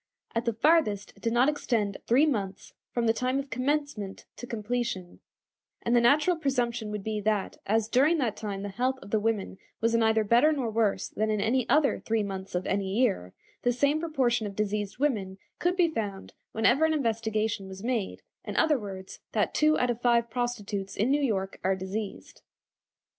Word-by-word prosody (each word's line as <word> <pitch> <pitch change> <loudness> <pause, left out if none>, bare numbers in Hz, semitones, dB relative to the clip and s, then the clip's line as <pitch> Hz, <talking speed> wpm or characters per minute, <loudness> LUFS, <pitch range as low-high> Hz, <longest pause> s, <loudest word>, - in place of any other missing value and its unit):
At 230 0 -1
the 235 - +1
farthest 230 -5 +2
it - - -21
did 230 - 0
not 240 +3 +4
extend 230 -9 0
three 260 +6 +5
months 200 -10 -3 0.2
from 240 -1 0
the 225 - +4
time 255 +3 0
of 275 0 -4
commencement 255 -5 -2
to 245 - -7
completion, 230 -5 -3 0.6
and 235 - +2
the 240 - +5
natural 295 +8 +4
presumption 240 -7 -1
would 210 -1 -4
be 215 0 -2
that, 210 -1 -1
as 220 +1 +2
during 280 +8 +3
that 240 -8 0
time 200 -2 -5
the 205 - -4
health 250 +6 -1
of 200 - -12
the 220 - +3
women 210 -3 -2 0.2
was 230 +1 +1
neither 220 -1 +3
better 240 +8 +4
nor 265 -7 -1
worse 220 -2 +1
than 215 +1 -1
in 215 -1 +1
any 230 +4 +1
other 300 -2 +3
three 225 -1 0
months 190 -2 -5
of 180 - -1
any 195 0 -1
year, 195 - +1 0.3
the 245 - +2
same 285 +5 +2
proportion 255 -9 0
of 200 - -8
diseased 210 0 -2
women 210 -9 -1 0.2
could 355 +1 +1
be 355 -2 +4
found 205 -9 -4 0.2
whenever 240 +7 +3
an 320 0 +3
investigation 220 -5 -1
was 190 +1 -9
made; 230 -5 -2 0.2
in - - -6
other 310 -4 +3
words, 195 -3 -8
that - - +1
two 310 0 +3
out 250 0 +2
of 240 0 -5
five 235 -1 +2
prostitutes 210 -5 -3
in 230 +6 +2
New 290 +1 +3
York 195 -8 -1
are 190 +1 +2
diseased. 195 +2 -6
225 Hz, 190 wpm, -28 LUFS, 205-255 Hz, 0.6 s, three